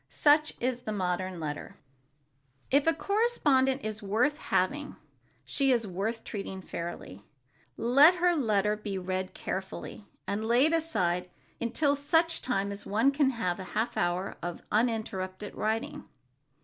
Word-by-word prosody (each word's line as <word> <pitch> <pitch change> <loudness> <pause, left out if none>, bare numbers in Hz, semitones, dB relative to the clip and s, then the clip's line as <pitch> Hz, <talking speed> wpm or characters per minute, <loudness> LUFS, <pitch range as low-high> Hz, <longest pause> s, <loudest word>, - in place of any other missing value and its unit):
Such 300 +1 +3
is 250 0 -1
the 220 - -5
modern 185 -2 -2
letter. 150 -2 -5 0.9
If 280 +3 +3
a - - +7
correspondent 290 - +2
is 215 0 -4
worth 225 +9 +1
having, 285 +11 -1 0.5
she 275 -1 +1
is 235 -3 +2
worth 210 +5 -3
treating 195 -3 -6
fairly. 170 - -7 0.5
Let 280 +9 +6
her 355 0 +3
letter 210 -7 +2
be 210 -2 -5
read 185 0 -3
carefully, 195 +2 -6 0.2
and 205 +2 -2
laid 245 +8 +4
aside 180 - 0 0.3
until 285 +5 +1
such 325 +4 +1
time 200 -5 -1
as 200 0 -6
one 225 +7 +2
can 280 -1 +3
have 190 -9 -2
a - - -5
half 220 +2 0
hour 175 +2 -1
of 175 0 -5
uninterrupted 210 -4 -1
writing. 220 +1 -2
220 Hz, 135 wpm, -29 LUFS, 190-280 Hz, 0.9 s, a